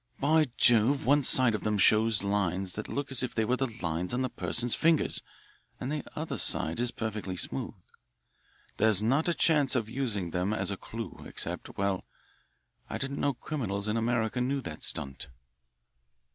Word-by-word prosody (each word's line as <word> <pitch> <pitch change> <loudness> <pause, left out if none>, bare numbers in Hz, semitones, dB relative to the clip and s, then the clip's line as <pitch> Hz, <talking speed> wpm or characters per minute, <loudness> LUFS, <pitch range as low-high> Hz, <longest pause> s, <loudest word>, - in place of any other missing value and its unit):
"By 155 +2 +3
Jove, 120 +4 +4
one 145 +2 +4
side 130 -3 +5
of 105 - -2
them 105 -1 0
shows 110 +1 +4
lines 95 -2 0
that 105 - -5
look 140 -1 -3
as 130 - +2
if 125 - -3
they 110 - +1
were 125 - +1
the 135 - 0 0.2
lines 85 +6 -1
on 130 +1 0
a - - -3
person's 120 0 0
fingers, 165 -1 +2 0.6
and 130 - -4
the 150 -1 -3
other 150 -6 -4
side 80 +1 +1
is 120 0 +2
perfectly 105 -5 -4
smooth. - - -3 1.0
There's 110 -2 +3
not 135 +9 +2
a - - +2
chance 145 -5 +3
of 115 -4 -1
using 110 -10 -2
them 90 +5 -1
as 100 -2 -1
a - - -2
clue, 115 +3 -8
except - - -5
well, 100 -1 -1 0.9
I - - -3
didn't 140 0 -3
know 140 -2 0
criminals 110 -8 -3
in 105 - 0
America 115 +1 0
knew 135 +3 0
that 75 -10 -8
stunt." 70 -4 -1
115 Hz, 175 wpm, -29 LUFS, 100-135 Hz, 1.0 s, side